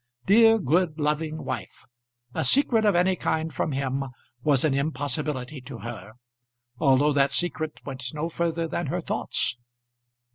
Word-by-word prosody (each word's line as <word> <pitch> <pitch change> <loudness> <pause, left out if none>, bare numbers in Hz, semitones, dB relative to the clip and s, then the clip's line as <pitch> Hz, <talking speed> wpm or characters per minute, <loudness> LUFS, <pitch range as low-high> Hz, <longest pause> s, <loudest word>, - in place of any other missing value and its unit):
Dear, 225 +2 +6
good, 165 - +1
loving 155 +1 -1
wife! - - -6 0.5
A - - -1
secret 225 - +3
of 205 -3 +4
any 185 +2 +3
kind 160 -2 -1
from 155 - -1
him 135 0 -1 0.4
was 140 -1 +3
an 150 - +2
impossibility 140 -1 -2
to 130 -1 -9
her, 110 -3 -8 0.7
although 145 +1 +4
that 140 -1 +3
secret 160 -1 -1
went 130 -2 -3
no 155 +2 -3
further 170 0 -1
than - - -3
her - - -2
thoughts. 115 - -2
150 Hz, 145 wpm, -26 LUFS, 135-165 Hz, 0.7 s, Dear